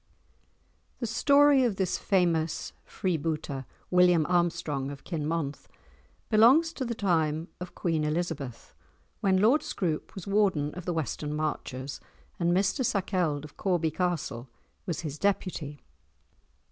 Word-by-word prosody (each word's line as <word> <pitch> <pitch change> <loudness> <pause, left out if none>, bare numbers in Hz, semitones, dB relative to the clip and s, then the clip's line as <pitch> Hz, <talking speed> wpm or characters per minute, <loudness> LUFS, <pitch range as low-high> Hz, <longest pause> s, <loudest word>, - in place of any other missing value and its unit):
The 240 - -2
story 280 +4 +5
of 235 -5 +1
this 190 -2 -1
famous 170 -4 +1
freebooter, 155 -7 -2 0.3
William 180 -3 +5
Armstrong 165 -6 0
of 140 -1 -9
Kinmonth, 155 -3 -3 0.6
belongs 260 +10 +5
to 260 - -3
the 235 -1 -3
time 160 -5 0
of 180 0 -8
Queen 165 -3 0
Elizabeth, 150 -6 -3 0.5
when 190 -1 +3
Lord 230 +10 +4
Scroope 165 -5 -3
was 190 - -7
Warden 195 -8 +1
of 180 -1 -8
the 175 - -1
Western 150 -1 -3
Marches, 140 -3 -3 0.4
and 170 0 +2
Mr 190 +7 +2
Sakelde 180 - 0
of 150 - -14
Corby 175 -5 +1
Castle 160 -9 -2 0.4
was 170 - -2
his 150 -2 -5
Deputy. 175 -7 -1
175 Hz, 125 wpm, -28 LUFS, 150-195 Hz, 0.6 s, story